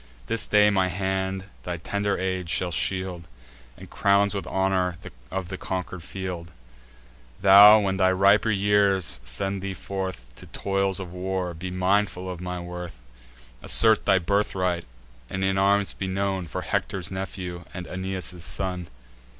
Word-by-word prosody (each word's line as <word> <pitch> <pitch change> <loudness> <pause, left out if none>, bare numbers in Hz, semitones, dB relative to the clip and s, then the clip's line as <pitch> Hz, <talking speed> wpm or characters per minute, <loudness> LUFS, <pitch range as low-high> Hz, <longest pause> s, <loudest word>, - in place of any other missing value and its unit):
This 115 - 0
day 105 0 +5
my 95 -2 +2
hand 95 +1 -2 0.2
thy 90 -1 -4
tender 100 +4 -1
age 95 -2 -2
shall 90 0 +1
shield, 90 -1 -1 0.5
And - - -11
crown 100 0 +2
with 100 - -4
honours 95 -2 0 0.3
of 95 -2 -4
the 95 -2 -6
conquer'd 95 -1 -4
field: 90 -2 -6 0.9
Thou, 100 +2 +9
when 95 -1 -1
thy 95 -1 +4
riper 100 +4 +4
years 100 -2 +2
shall 65 - -15
send 95 +9 -2
thee 100 -1 -4
forth 95 -9 -5
To - - -11
toils 95 -1 -1
of 90 -2 -7
war, 90 -1 -3
be 90 +3 -6
mindful 95 0 0
of 90 -1 -7
my 90 0 -4
worth; 90 -3 -7 0.6
Assert 110 - +4
thy 95 - +5
birthright, 90 -2 0 0.4
and 95 0 -3
in 95 0 +1
arms 100 +1 +2
be 95 - -4
known, 95 -1 -2
For - - -5
Hector's 95 -2 -2
nephew, 90 -2 -5
and 90 -1 -7
Aeneas' 95 -2 -4
son." 90 -1 -2
95 Hz, 150 wpm, -25 LUFS, 90-100 Hz, 0.9 s, Thou